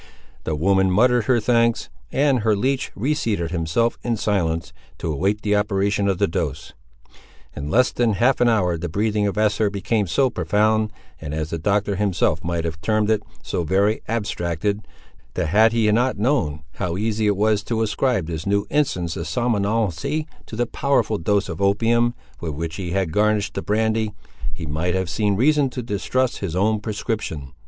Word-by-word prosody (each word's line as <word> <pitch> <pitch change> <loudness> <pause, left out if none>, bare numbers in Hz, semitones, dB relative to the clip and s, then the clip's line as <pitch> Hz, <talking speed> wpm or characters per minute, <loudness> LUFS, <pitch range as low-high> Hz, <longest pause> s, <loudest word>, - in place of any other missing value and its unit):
The 80 - -1
woman 95 +4 +3
muttered 120 +4 +3
her 125 -1 +3
thanks, 115 0 +2 0.2
and 135 -2 +2
her 110 -1 +2
leech 130 +5 -1
reseated 110 - -1
himself 90 +8 0
in 120 -2 -1
silence, 90 -6 -1 0.2
to 80 - -3
await 100 +8 0
the 105 -1 +2
operation 100 -1 +1
of 95 -2 +1
the 100 - +3
dose. 75 -4 -3 0.8
In 75 0 -5
less 125 +10 +3
than 120 -3 +1
half 125 +7 +2
an 120 - +5
hour 90 -7 +1
the 85 - -4
breathing 105 +3 0
of 100 - -3
Esther 105 0 +2
became 100 +1 -1
so 130 +8 +2
profound, 110 -1 +1 0.3
and, 75 -1 -5
as 80 0 -3
the 85 - -2
Doctor 100 +2 0
himself 95 -6 +1
might 85 -1 -2
have 80 -1 -4
termed 110 +5 +1
it, 110 -1 +2 0.2
so 85 - -2
very 100 +6 +1
abstracted, 100 -2 -2 0.5
that 85 -4 -1
had 110 +5 +5
he 115 -2 +2
not 125 +3 +2
known 100 - 0
how 90 -2 -2
easy 110 +1 0
it 100 -2 +2
was 105 0 +2
to 115 -1 0
ascribe 110 -2 0
this 80 +2 -5
new 100 0 +1
instance 90 - 0
of 85 - -4
somnolency 115 - 0 0.2
to - - -8
the 120 +2 +1
powerful 130 -4 0
dose 100 +4 +1
of 85 0 -6
opium 115 +4 +2 0.2
with 80 -3 -4
which 80 +2 -4
he 90 -3 -4
had 95 -2 -1
garnished 105 0 +1
the 95 - -3
brandy, 110 0 0 0.4
he 80 - -6
might 80 +5 -1
have 95 -3 -1
seen 105 +2 +1
reason 145 +4 +3
to 125 0 -5
distrust 120 +4 -1
his 90 -4 -4
own 105 +3 +2
prescription. 105 - -4
105 Hz, 180 wpm, -22 LUFS, 90-115 Hz, 0.8 s, an